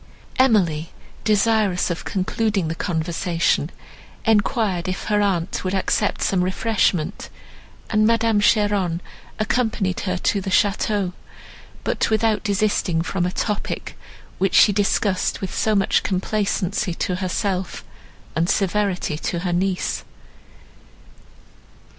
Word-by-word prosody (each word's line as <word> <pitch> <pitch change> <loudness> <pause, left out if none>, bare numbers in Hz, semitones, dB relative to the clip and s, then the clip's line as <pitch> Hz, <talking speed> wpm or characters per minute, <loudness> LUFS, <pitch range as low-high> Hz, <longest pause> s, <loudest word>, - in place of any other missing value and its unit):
Emily, 180 -11 +3 0.3
desirous 210 -4 +2
of 170 - -5
concluding 195 -1 -1
the - - -1
conversation, 165 -1 0 0.6
enquired 210 -4 +1
if 185 0 -3
her 210 -1 +1
aunt 185 -5 0
would 185 +1 -1
accept 200 +2 0
some 185 -2 +2
refreshment, 185 -2 0 0.6
and 215 0 +4
Madame 230 -2 +3
Cheron 205 -5 +2 0.4
accompanied 215 -4 0
her 185 -2 -2
to 200 +2 0
the 190 - -4
château, 200 -1 +1 0.7
but - - 0
without 220 0 +1
desisting 200 -5 +1
from 180 0 -1
a - - -2
topic, 210 +2 -3 0.4
which 195 0 +1
she 205 - +7
discussed 200 -1 +1
with 190 - -5
so 215 -1 +1
much 195 -1 +3
complacency 195 -1 -1
to 180 +1 -2
herself, 185 0 -2 0.5
and 170 +2 +1
severity 195 -5 0
to 170 0 -2
her 180 -1 -1
niece. 185 +1 -1
195 Hz, 115 wpm, -22 LUFS, 180-210 Hz, 0.7 s, she